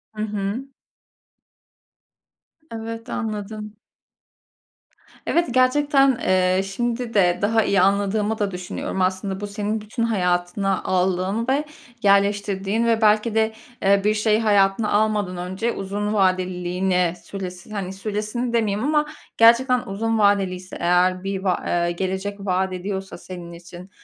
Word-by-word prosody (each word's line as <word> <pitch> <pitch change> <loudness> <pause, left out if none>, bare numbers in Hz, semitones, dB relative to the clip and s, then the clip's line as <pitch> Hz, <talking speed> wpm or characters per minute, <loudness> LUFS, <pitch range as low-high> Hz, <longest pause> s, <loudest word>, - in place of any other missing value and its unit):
Hı 215 - -4
hı. 210 +5 -3 2.0
Evet, 230 +1 -6
anladım. 215 -1 -5 1.5
Evet, 340 0 +1
gerçekten, 270 +1 +3
eee, 185 0 +3
şimdi 235 +4 -3
de 180 -4 +3
daha 220 +2 +3
iyi 195 -2 +2
anladığımı 205 +3 +1
da 205 -2 0
düşünüyorum. 180 +1 -4
Aslında 190 +1 -1
bu 205 - -4
senin 210 +1 -3
bütün 215 +3 -4
hayatına 190 -2 0
aldığın 185 +5 0
ve 275 +3 +2 0.4
yerleştirdiğin 200 +2 +2
ve 230 -1 +2
belki 215 +1 +3
de, 220 0 +2 0.3
eee, 195 0 +4
bir 210 +1 +3
şey 215 0 +2
hayatına 205 -1 +2
almadan 205 -3 +1
önce 190 +6 -2
uzun 205 +2 -3
vadeliliğini, 185 -2 +1
süres 185 0 -7
hani, 195 -3 -4
süresini 215 +4 -3
demeyeyim 220 0 0
ama 300 0 +2 0.3
gerçekten 245 +3 +5
uzun 225 +3 -1
vadeliyse 190 -3 +1
eğer 180 +1 +2
bir 195 -1 -3
va 185 -2 0
eee, 175 0 +1
gelecek 190 +3 -3
vaat 185 0 0
ediyorsa 190 +1 -5
senin 175 -2 -9
için 175 +2 -12
200 Hz, 125 wpm, -22 LUFS, 185-220 Hz, 2.0 s, gerçekten